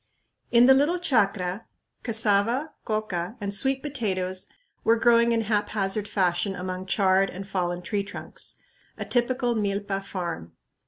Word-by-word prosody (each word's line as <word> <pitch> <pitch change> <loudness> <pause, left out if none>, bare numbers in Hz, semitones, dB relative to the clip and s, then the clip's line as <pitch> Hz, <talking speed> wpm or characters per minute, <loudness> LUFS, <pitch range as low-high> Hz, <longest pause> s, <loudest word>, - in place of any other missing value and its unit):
In 235 0 +6
the 265 - +8
little 290 +6 +3
chacra, 205 - 0 0.3
cassava, 230 +5 +1
coca, 215 -3 -2
and 200 -1 -3
sweet 265 +6 +1
potatoes 190 -10 -2 0.3
were 225 - +4
growing 235 0 +4
in 230 -1 +2
haphazard 210 -1 0
fashion 185 -1 0
among 185 +1 -5
charred 195 -1 +3
and 195 +2 -8
fallen 180 -2 -2
tree 205 +1 -1
trunks; 200 - -8 0.4
a - - -4
typical 245 0 +1
milpa 200 -2 -2
farm. 170 - -5
205 Hz, 130 wpm, -26 LUFS, 190-235 Hz, 0.4 s, the